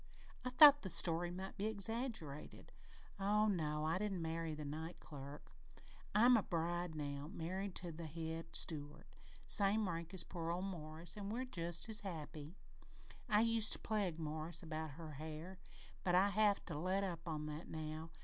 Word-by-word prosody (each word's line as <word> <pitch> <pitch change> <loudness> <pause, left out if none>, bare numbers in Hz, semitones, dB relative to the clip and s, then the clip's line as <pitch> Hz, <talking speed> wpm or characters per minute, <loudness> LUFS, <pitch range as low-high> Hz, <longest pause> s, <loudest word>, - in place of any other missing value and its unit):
I 250 - -1
thought 290 +3 +9
the 190 - -5
story 170 0 +5
might 190 +3 -6
be 205 +2 0
exaggerated. 220 - -2 0.5
Oh 210 +2 +3
no, 155 -6 0
I 165 +4 +1
didn't 195 -4 -2
marry 160 -1 -2
the 150 0 -6
night 160 +4 -5
clerk. 145 -1 -10 0.6
I'm 240 +4 +7
a 225 - +4
bride 175 -1 -2
now, 145 0 -4
married 185 +3 -4
to 175 -1 -3
the 165 0 -7
head 165 +1 -5
steward, 150 -1 -1 0.4
same 205 +1 +3
rank 170 -1 -4
as 185 - 0
poor 165 -1 -5
old 180 +3 -1
Morris 165 -2 -4
an' 200 -1 -5
we're 245 +4 -2
just 170 -7 -2
as 220 -1 +3
happy! 160 -3 -7 0.7
I 210 -1 +5
used 230 -1 +4
to - - +1
pleg 200 -7 -1
Morris 160 +2 -3
about 155 -2 -4
her 160 -2 -7
hair, 155 +5 -7 0.4
but 175 -1 +2
I'd 195 +2 +5
have 205 0 +3
to 155 -5 -4
let 185 +4 0
up 175 -3 -4
on 155 -2 -3
that 150 +2 -6
now. 155 +1 -5
170 Hz, 170 wpm, -39 LUFS, 155-200 Hz, 0.7 s, thought